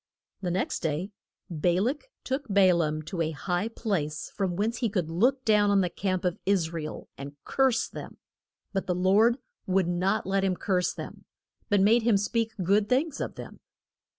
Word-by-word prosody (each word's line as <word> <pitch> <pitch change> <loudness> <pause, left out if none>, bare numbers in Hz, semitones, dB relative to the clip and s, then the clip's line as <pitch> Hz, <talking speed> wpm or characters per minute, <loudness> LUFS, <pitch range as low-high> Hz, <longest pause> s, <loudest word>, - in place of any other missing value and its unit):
The 180 - -2
next 180 +2 -1
day 165 +5 -2 0.4
Ba 175 +2 +1
lak 275 - -1
took 270 +2 -3
Ba 195 -3 +5
laam 155 -2 0
to 170 +2 -4
a 160 - +1
high 180 +5 -1
place, 175 -10 -3
from 190 -3 -2
whence 220 +5 -1
he 235 -2 0
could 180 -6 -2
look 250 +10 +2
down 210 -2 +4
on 200 -1 +4
the 180 -2 -1
camp 185 -1 -2
of 180 -1 0
Is 180 -5 +1
ra 165 - -3
el, 155 - -7
and 140 +1 -7
curse 265 -4 +2
them. - - -9 0.6
But 195 - -2
the 180 - 0
Lord 205 +7 +4 0.3
would 190 -1 +2
not 180 +4 0
let 195 +1 +1
him 190 -1 +1
curse 180 -1 0
them, - - -9 0.4
but 205 -2 +4
made 225 +4 +5
him 225 -2 +3
speak 225 +3 0
good 200 +3 +2
things 280 +4 +1
of - - -4
them. - - -9
195 Hz, 190 wpm, -27 LUFS, 175-220 Hz, 0.6 s, Ba